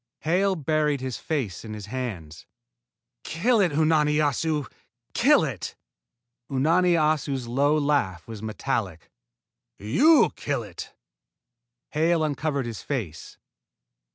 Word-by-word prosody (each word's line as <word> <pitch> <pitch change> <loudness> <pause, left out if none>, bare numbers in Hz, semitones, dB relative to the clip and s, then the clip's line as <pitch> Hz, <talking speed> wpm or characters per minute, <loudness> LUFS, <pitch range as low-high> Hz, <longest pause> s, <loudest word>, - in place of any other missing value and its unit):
Hale 190 +4 +2
buried 150 -2 0
his 130 -2 -4
face 130 - -3
in 110 -1 -7
his 105 -2 -8
hands. 105 -10 -6 0.8
"Kill 225 +9 +1
it, 180 -4 +2
Unani 155 -1 +3
Assu! 150 0 0 0.5
Kill - - +4
it!" - - -4 0.7
Unani 165 +7 +3
Assu's 150 -5 0
low 140 +5 +2
laugh 140 - 0
was 110 -3 -8
metallic. 110 - -3 0.7
"You 270 - +4
kill - - -2
it." - - -9 0.9
Hale 160 +1 +1
uncovered 145 -2 -1
his 115 -2 -6
face. 100 - -5
145 Hz, 110 wpm, -25 LUFS, 115-155 Hz, 0.9 s, Kill